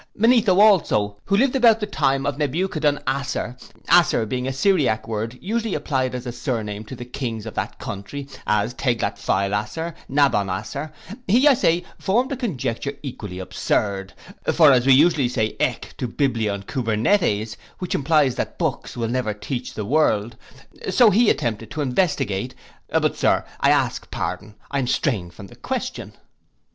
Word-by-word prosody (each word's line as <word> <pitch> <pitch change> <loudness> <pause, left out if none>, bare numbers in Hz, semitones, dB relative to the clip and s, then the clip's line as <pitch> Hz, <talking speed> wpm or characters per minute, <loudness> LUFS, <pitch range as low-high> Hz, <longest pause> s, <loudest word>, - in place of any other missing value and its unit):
Manetho 225 -4 +4
also, 135 - +4
who 200 - +2
lived 270 +3 +2
about 230 -4 +5
the 210 - -1
time 135 -8 0
of 145 - -1
Nebuchadon 150 0 0
Asser, 135 -2 -2 0.3
Asser 170 -9 +4
being 125 +3 -3
a - - -1
Syriac 135 - +1
word 115 +2 -3
usually 225 +1 -2
applied 130 -3 -1
as 125 0 -5
a 120 - -3
sirname 110 -4 -4
to 130 - -7
the 120 0 -8
kings 120 -3 -5
of 110 - -6
that - - -4
country, 135 +8 -6 0.2
as 105 +3 +1
Teglat 120 -6 -1
Phael 100 +1 0
Asser, 160 +11 -3 0.2
Nabon 135 -8 +2
Asser, 140 +11 -4 0.4
he, 245 +9 +5
I 290 - +8
say, 175 -7 +2 0.2
formed 245 +8 +1
a - - 0
conjecture 140 - -3
equally 105 -9 -6
absurd; 95 +1 -2 0.4
for 155 -4 +6
as 125 -1 +3
we 135 - +8
usually 145 -2 +4
say 110 -3 -1
ek - - -1
to 125 - -1
biblion 115 -6 -1
kubernetes, 110 - 0 0.2
which 180 - -4
implies 145 -2 +3
that - - -3
books - - -3
will 115 -1 -1
never 120 -3 -1
teach 125 +4 -5
the 105 - -4
world; 115 -4 +1 0.5
so 215 +4 +5
he 225 +3 +4
attempted 115 -5 -1
to 150 - -4
investigate—But, 130 - -1
Sir, - - +2
I - - +3
ask - - +1
pardon, 105 0 -4 0.2
I 140 - 0
am 130 - -1
straying 110 - 0
from 85 +3 -12
the - - -14
question. - - -4
130 Hz, 165 wpm, -22 LUFS, 110-165 Hz, 0.5 s, I